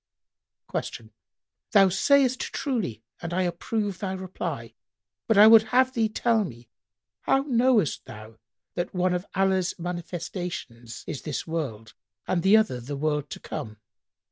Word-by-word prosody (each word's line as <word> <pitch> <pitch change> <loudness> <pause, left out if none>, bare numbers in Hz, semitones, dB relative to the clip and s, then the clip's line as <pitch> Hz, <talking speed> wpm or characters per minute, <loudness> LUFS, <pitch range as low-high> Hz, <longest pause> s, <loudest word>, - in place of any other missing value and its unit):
Q 110 -1 -5 0.6
"Thou 195 -2 +7
sayst 260 +6 +3
truly 205 - -3 0.2
and 170 0 -4
I 185 - +2
approve 195 +3 -2
thy 190 -2 -3
reply; 185 -1 -5 0.5
but 225 - +3
I 210 - +10
would 220 0 +9
have 260 0 +4
thee 225 -3 +1
tell 225 0 +2
me, 120 - -9 0.5
how 270 0 +2
knowest 240 - +2
thou 110 +1 -11 0.3
that 175 +2 -3
one 180 0 +2
of 180 +2 -3
Allah's 190 -1 +1
manifestations 170 - -6
is 135 - -5
this 150 -4 -4
world 130 -10 -4 0.3
and 175 - +1
the 195 +5 +6
other 215 - +1
the 140 +4 -6
world 150 -1 -1
to - - -7
come?" 110 -1 -6
180 Hz, 145 wpm, -26 LUFS, 145-215 Hz, 0.6 s, I